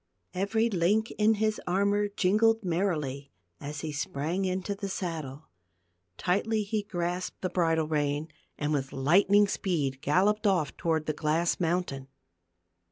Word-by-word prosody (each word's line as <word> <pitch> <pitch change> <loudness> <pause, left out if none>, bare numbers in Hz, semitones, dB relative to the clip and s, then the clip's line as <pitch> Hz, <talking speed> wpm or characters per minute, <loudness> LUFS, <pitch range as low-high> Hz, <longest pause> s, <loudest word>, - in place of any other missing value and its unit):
Every 205 +5 +1
link 210 +2 +1
in 215 +1 +4
his 215 0 0
armor 200 +3 +2
jingled 215 +3 +2
merrily 155 -7 -1 0.3
as 145 0 -6
he 155 - -4
sprang 150 +6 -2
into 185 +2 -2
the 200 0 -5
saddle; 160 -6 -5 0.7
tightly 210 +4 0
he 210 +1 -1
grasped 180 -2 -3
the 185 - -1
bridle 165 -3 +1
rein, 150 0 -1 0.3
and 150 0 -1
with 135 -2 -2
lightning 195 +9 +4
speed 145 -10 -1
galloped 205 +9 +2
off 175 -7 +1
toward 160 -2 0
the 155 - -1
a - - -18
glass 160 +2 +1
mountain. 165 -6 -1
180 Hz, 140 wpm, -28 LUFS, 150-200 Hz, 0.7 s, in